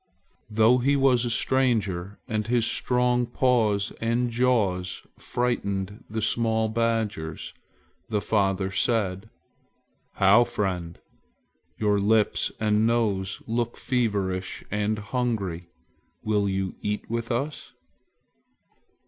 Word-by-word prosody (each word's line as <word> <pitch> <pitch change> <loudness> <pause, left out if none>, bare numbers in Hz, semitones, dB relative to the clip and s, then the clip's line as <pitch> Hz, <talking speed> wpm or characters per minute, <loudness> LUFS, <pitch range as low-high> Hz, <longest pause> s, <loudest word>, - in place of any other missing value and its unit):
Though 110 +3 +4
he 140 +3 +2
was 130 -3 +3
a - - -1
stranger 105 -7 +1
and 110 -3 -2
his 120 -1 +2
strong 125 0 +1
paws 115 -5 +1
and 120 +1 0
jaws 110 -7 0 0.2
frightened 100 -5 -2
the 110 0 -3
small 110 -1 +1
badgers, 110 -8 -2 0.6
the 105 -2 +1
father 95 -2 0
said, 105 -1 0 0.9
"How, 100 +4 +6
how, - - +6
friend! 95 -7 -3 0.8
Your 105 -1 +2
lips 105 +1 +2
and 110 0 +2
nose 100 -5 0
look 120 +1 -2
feverish 100 -7 -1
and 105 +1 0
hungry. 100 -7 -3 0.5
Will 105 -2 +1
you 95 -1 -2
eat 105 0 -3
with 115 +2 -3
us?" 140 +6 -3
110 Hz, 105 wpm, -26 LUFS, 100-120 Hz, 0.9 s, How